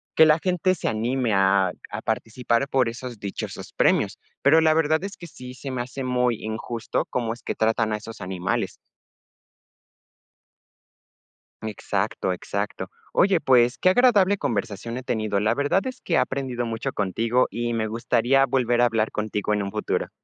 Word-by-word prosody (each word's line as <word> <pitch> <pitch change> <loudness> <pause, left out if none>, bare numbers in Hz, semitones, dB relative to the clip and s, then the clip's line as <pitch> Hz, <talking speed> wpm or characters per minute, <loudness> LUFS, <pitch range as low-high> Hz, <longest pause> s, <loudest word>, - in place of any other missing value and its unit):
que 160 - +8
la 155 +1 +5
gente 185 0 +1
se 175 - -4
anime 120 +1 0
a 95 -1 +3 0.2
a - - -4
participar 115 +3 -1
por 130 -3 +2
esos 120 -1 -7
dichosos 100 -1 -6
premios. - - +2 0.2
Pero, 160 +4 +5
la 160 -1 +4
verdad 160 +1 +2
es 200 +1 -5
que 170 - -10
sí, 125 -5 -10
se 130 +2 -7
me 125 -2 -2
hace 130 +2 -6
muy 125 -2 +1
injusto 110 +1 -3
cómo 115 -2 -1
es 120 - -14
que - - -2
tratan 110 0 +1
a 105 - 0
esos 110 +1 -10
animales. 90 -2 -2 2.9
Exacto, 105 -3 -2
exacto. 90 - -4 0.2
Oye, 185 -3 +3
pues, 125 -1 +4
qué 185 - +4
agradable 205 -3 +4
conversación 115 - -3
he 130 - -6
tenido, 110 -4 -1
la 105 - +2
verdad 145 - +1
es 255 0 -6
que 170 - -4
he - - +5
aprendido 125 -3 -1
mucho 115 -1 -3
contigo 115 +5 +1
y 120 0 -2
me 110 -1 -1
gustaría 120 +4 +2
volver 120 -2 +1
a 120 - +6
hablar 110 -2 +1
contigo 105 0 -2
en 105 -1 0
un 100 - -4
futuro. 105 - -2
120 Hz, 170 wpm, -24 LUFS, 110-135 Hz, 2.9 s, que